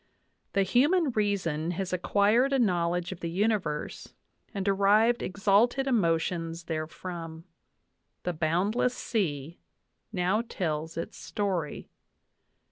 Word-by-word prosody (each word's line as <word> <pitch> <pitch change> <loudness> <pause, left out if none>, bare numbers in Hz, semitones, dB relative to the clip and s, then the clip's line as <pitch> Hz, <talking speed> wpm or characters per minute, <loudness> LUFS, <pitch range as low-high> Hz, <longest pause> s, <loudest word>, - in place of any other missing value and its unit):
"The 195 - +3
human 285 - +3
reason 190 -8 0
has 190 -2 -3
acquired 210 +8 +3
a - - +4
knowledge 175 -5 +1
of 185 - -7
the 170 - -3
universe 185 -5 -2 0.4
dnd 195 - -1
derived 205 +4 +3
exalted 205 +7 +2
emotions 165 -7 0
therefrom. 165 0 -5 0.8
The 180 - -1
boundless 185 +10 +1
sea 165 - -2 0.5
now 190 +2 +1
tells 160 -8 -3
its 165 - -5
story. 185 -7 -3
190 Hz, 105 wpm, -28 LUFS, 165-215 Hz, 0.8 s, a